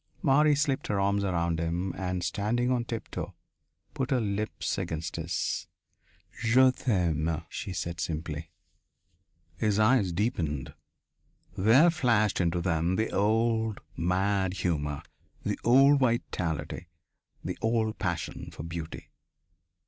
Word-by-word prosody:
Marie 150 Hz, 0 st, +5 dB
slipped 140 Hz, -2 st, 0 dB
her 100 Hz, -, 0 dB
arms 100 Hz, +1 st, +1 dB
around 85 Hz, -3 st, 0 dB
him 85 Hz, +3 st, -1 dB
and, 90 Hz, -1 st, -2 dB
standing 120 Hz, +7 st, 0 dB
on 125 Hz, -2 st, +1 dB
tiptoe, 115 Hz, -1 st, -5 dB, 0.6 s
put 130 Hz, -3 st, -2 dB
her 130 Hz, -, +2 dB
lips 105 Hz, -1 st, -2 dB
against 80 Hz, +1 st, -4 dB
his. 85 Hz, +1 st, -2 dB, 0.7 s
"Je 130 Hz, +3 st, +5 dB
t'aime," 85 Hz, -, 0 dB
she 100 Hz, -, -5 dB
said 85 Hz, 0 st, -4 dB
simply. 80 Hz, -1 st, -4 dB, 1.1 s
His 105 Hz, -1 st, +1 dB
eyes 110 Hz, -3 st, +4 dB
deepened. 85 Hz, -, -2 dB, 0.8 s
There 125 Hz, -, +6 dB
flashed 115 Hz, -, +2 dB
into 85 Hz, 0 st, +1 dB
them 85 Hz, 0 st, +1 dB
the 110 Hz, +2 st, 0 dB
old, 110 Hz, +1 st, +1 dB, 0.2 s
mad 95 Hz, +2 st, +1 dB
humour, 75 Hz, -4 st, -1 dB, 0.4 s
the -, -, -2 dB
old 135 Hz, +4 st, +6 dB
vitality, 90 Hz, -, -1 dB, 0.6 s
the -, -, -4 dB
old 110 Hz, -1 st, 0 dB
passion 85 Hz, -5 st, -3 dB
for -, -, -8 dB
beauty. 85 Hz, -1 st, -7 dB
100 Hz, 120 wpm, -29 LUFS, 85-115 Hz, 1.1 s, There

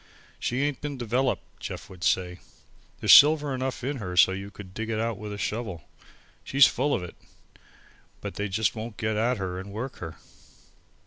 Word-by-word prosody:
"She 125 Hz, +3 st, -1 dB
ain't 145 Hz, -2 st, -1 dB
been 145 Hz, -2 st, -4 dB
developed," 125 Hz, +2 st, 0 dB, 0.2 s
Jeff -, -, -6 dB
would 90 Hz, -2 st, -11 dB
say. 90 Hz, -1 st, +1 dB, 0.6 s
"There's -, -, +6 dB
silver 150 Hz, -1 st, +7 dB
enough 130 Hz, 0 st, -3 dB
in 140 Hz, +2 st, -2 dB
her 90 Hz, -6 st, -5 dB
so 95 Hz, -, +7 dB
you 95 Hz, +1 st, -5 dB
could 100 Hz, -2 st, -12 dB
dig 110 Hz, +2 st, -4 dB
it 110 Hz, -1 st, -1 dB
out 115 Hz, 0 st, -1 dB
with 105 Hz, 0 st, -6 dB
a 105 Hz, -, -5 dB
shovel. 105 Hz, -, -3 dB, 0.6 s
She's 135 Hz, 0 st, +6 dB
full 140 Hz, +3 st, +1 dB
of 90 Hz, -, -3 dB
it. 90 Hz, -, -9 dB, 1.0 s
But -, -, -6 dB
they 105 Hz, 0 st, -3 dB, 0.2 s
won't 110 Hz, -1 st, -7 dB
get 110 Hz, -1 st, -1 dB
at 115 Hz, +3 st, +1 dB
her 95 Hz, -2 st, -4 dB
and 100 Hz, +2 st, -8 dB
work 125 Hz, +6 st, -5 dB
her." 80 Hz, -2 st, -7 dB
110 Hz, 185 wpm, -27 LUFS, 95-130 Hz, 1.0 s, silver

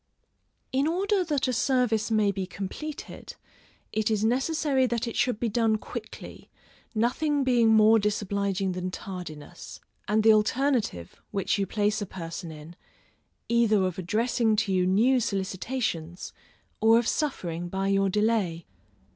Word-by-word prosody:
In 270 Hz, +3 st, +1 dB
order 385 Hz, +3 st, +1 dB
that 295 Hz, -6 st, -1 dB
a 255 Hz, -, 0 dB
service 235 Hz, -3 st, +1 dB
may 215 Hz, -2 st, +2 dB
be 190 Hz, -1 st, -4 dB
completed, 200 Hz, +12 st, -7 dB, 0.6 s
it 220 Hz, +1 st, 0 dB
is 215 Hz, -1 st, 0 dB
necessary 265 Hz, +2 st, +1 dB
that 235 Hz, 0 st, -2 dB
it 230 Hz, -, -5 dB
should 245 Hz, -5 st, +1 dB
be 240 Hz, -, 0 dB
done 225 Hz, 0 st, +2 dB
quickly, -, -, -9 dB, 0.5 s
nothing 280 Hz, +6 st, +1 dB
being 240 Hz, -3 st, +3 dB
more 220 Hz, 0 st, +6 dB
disobliging 200 Hz, -2 st, -1 dB
than 180 Hz, 0 st, -3 dB
tardiness, 180 Hz, -5 st, -8 dB, 0.3 s
and 215 Hz, +1 st, +2 dB
the 220 Hz, 0 st, +7 dB
alternative, 215 Hz, -, 0 dB
which 200 Hz, +1 st, -1 dB
you 195 Hz, -, 0 dB
place 210 Hz, +1 st, 0 dB
a 205 Hz, -, -3 dB
person 165 Hz, -1 st, -7 dB
in, 155 Hz, +2 st, -11 dB, 0.7 s
either 230 Hz, -4 st, +3 dB
of 185 Hz, 0 st, -2 dB
addressing 220 Hz, +4 st, +1 dB
to 205 Hz, -2 st, 0 dB
you 180 Hz, -1 st, +2 dB
new 235 Hz, +8 st, +3 dB
solicitations, 190 Hz, -4 st, -3 dB, 0.5 s
or 225 Hz, +1 st, +5 dB
of 235 Hz, -1 st, +1 dB
suffering 175 Hz, -, -2 dB
by 195 Hz, +2 st, -2 dB
your 195 Hz, 0 st, +2 dB
delay. 205 Hz, -5 st, 0 dB
215 Hz, 140 wpm, -27 LUFS, 190-245 Hz, 0.7 s, the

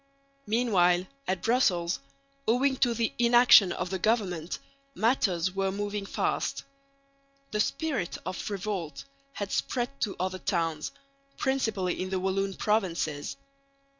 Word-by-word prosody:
Meanwhile 190 Hz, -6 st, +3 dB, 0.2 s
at 185 Hz, -1 st, -1 dB
Brussels, 185 Hz, -8 st, +2 dB, 0.5 s
owing 260 Hz, +4 st, +3 dB
to 240 Hz, -3 st, +2 dB
the 230 Hz, -1 st, 0 dB
inaction 240 Hz, -5 st, +7 dB
of 180 Hz, +1 st, -3 dB
the 190 Hz, -, -2 dB
government, 185 Hz, -6 st, 0 dB, 0.4 s
matters 190 Hz, -6 st, +1 dB
were 195 Hz, 0 st, 0 dB
moving 205 Hz, 0 st, -3 dB
fast. -, -, -1 dB, 0.9 s
The 210 Hz, -, -1 dB
spirit 265 Hz, -, -1 dB
of 185 Hz, -, -4 dB
revolt 195 Hz, -7 st, -4 dB, 0.3 s
had 200 Hz, -1 st, -4 dB
spread 245 Hz, +1 st, -1 dB
to 205 Hz, -, 0 dB
other 185 Hz, +1 st, -2 dB
towns, 165 Hz, -6 st, -1 dB, 0.5 s
principally 220 Hz, -10 st, 0 dB
in 185 Hz, -, -3 dB
the 190 Hz, 0 st, -1 dB
Walloon 190 Hz, +1 st, -1 dB
provinces. 170 Hz, -, -1 dB
195 Hz, 120 wpm, -28 LUFS, 180-230 Hz, 0.9 s, inaction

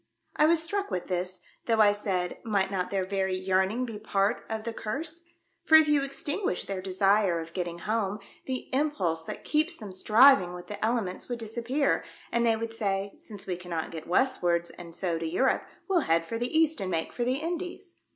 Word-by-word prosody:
I 305 Hz, -, +5 dB
was 335 Hz, 0 st, +4 dB
struck 400 Hz, +4 st, -2 dB
with 180 Hz, -, -3 dB
this, 180 Hz, 0 st, -2 dB, 0.3 s
though 225 Hz, -2 st, +2 dB
I 210 Hz, -1 st, +7 dB
said, 190 Hz, -4 st, -2 dB
"Might 200 Hz, -3 st, +1 dB
not 185 Hz, -2 st, -1 dB
their 195 Hz, -2 st, -1 dB
very 190 Hz, -1 st, -1 dB
yearning 190 Hz, +6 st, +1 dB
be 225 Hz, -3 st, -6 dB
a -, -, -11 dB
part 205 Hz, +1 st, 0 dB
of 220 Hz, -1 st, -3 dB
the 230 Hz, 0 st, -4 dB
Curse? 315 Hz, +11 st, -5 dB, 0.4 s
For 315 Hz, -, +6 dB
if 315 Hz, -1 st, +8 dB
you 295 Hz, -1 st, +4 dB
extinguish 275 Hz, -, -2 dB
their 195 Hz, -1 st, -4 dB
desire 195 Hz, -1 st, +2 dB
of 165 Hz, 0 st, -8 dB
getting 175 Hz, -2 st, -3 dB
home, 210 Hz, +1 st, -1 dB, 0.3 s
the 260 Hz, -1 st, -3 dB
impulse 190 Hz, -, 0 dB
that -, -, -6 dB
keeps 315 Hz, +3 st, +1 dB
them 210 Hz, -4 st, -8 dB
striving 210 Hz, -1 st, +6 dB
with 180 Hz, -, -9 dB
the 210 Hz, -, -6 dB
elements 220 Hz, -4 st, -1 dB
would 245 Hz, -, -2 dB
disappear, 235 Hz, +5 st, 0 dB, 0.3 s
and 235 Hz, 0 st, +2 dB
they 230 Hz, -1 st, +4 dB
would 225 Hz, 0 st, -4 dB
say, 200 Hz, -2 st, -1 dB
' -, -, -27 dB
Since 205 Hz, -2 st, -9 dB
we 185 Hz, -3 st, -2 dB
cannot 175 Hz, -3 st, -4 dB
get 160 Hz, -2 st, -7 dB
westwards 175 Hz, -5 st, +1 dB
and 170 Hz, -2 st, -10 dB
so 175 Hz, -3 st, -1 dB
to 165 Hz, -, -3 dB
Europe, 220 Hz, +11 st, +1 dB, 0.2 s
we'll 380 Hz, -3 st, +3 dB
head 165 Hz, -, +2 dB
for 230 Hz, +5 st, -4 dB
the 245 Hz, +1 st, -1 dB
east 320 Hz, -5 st, +3 dB
and 190 Hz, -, -2 dB
make 165 Hz, -3 st, -2 dB
for 240 Hz, -, -1 dB
the 250 Hz, +2 st, +1 dB
Indies 350 Hz, +4 st, -5 dB
210 Hz, 210 wpm, -28 LUFS, 185-260 Hz, 0.4 s, if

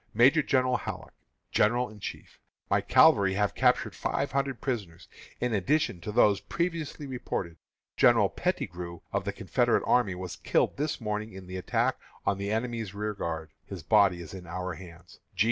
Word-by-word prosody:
Major 135 Hz, +8 st, +6 dB
General 130 Hz, -3 st, +2 dB
Halleck, -, -, -7 dB, 0.4 s
General 120 Hz, +4 st, +3 dB
in 110 Hz, -1 st, -13 dB
Chief: -, -, -8 dB, 0.3 s
My -, -, +4 dB
cavalry 95 Hz, -1 st, +5 dB
have 105 Hz, 0 st, +1 dB
captured -, -, +2 dB
five -, -, -2 dB
hundred 135 Hz, -2 st, -1 dB
prisoners, 100 Hz, -, -4 dB, 0.3 s
in 125 Hz, -2 st, 0 dB
addition 105 Hz, -, +1 dB
to 105 Hz, -, -5 dB
those 105 Hz, -3 st, +4 dB
previously 165 Hz, -, -3 dB
reported. 95 Hz, -10 st, -4 dB, 0.4 s
General -, -, +5 dB
Pettigrew, 85 Hz, -1 st, -3 dB
of 100 Hz, 0 st, -1 dB
the 100 Hz, -, -1 dB
Confederate 115 Hz, +4 st, +1 dB
army, 105 Hz, -7 st, +2 dB
was 90 Hz, -1 st, -6 dB
killed -, -, +1 dB
this 150 Hz, +2 st, -2 dB
morning 105 Hz, -1 st, -3 dB
in 95 Hz, 0 st, -9 dB
the 90 Hz, +1 st, -6 dB
attack 90 Hz, -, 0 dB, 0.3 s
on 100 Hz, -, +1 dB
the 100 Hz, 0 st, -3 dB
enemy's 115 Hz, -3 st, -2 dB
rearguard. 85 Hz, -7 st, -3 dB
His 95 Hz, -5 st, -8 dB
body 100 Hz, -2 st, +4 dB
is 80 Hz, -, -11 dB
in 90 Hz, -2 st, -9 dB
our 90 Hz, +2 st, -4 dB
hands. 85 Hz, +1 st, -13 dB
100 Hz, 160 wpm, -28 LUFS, 90-120 Hz, 0.4 s, Major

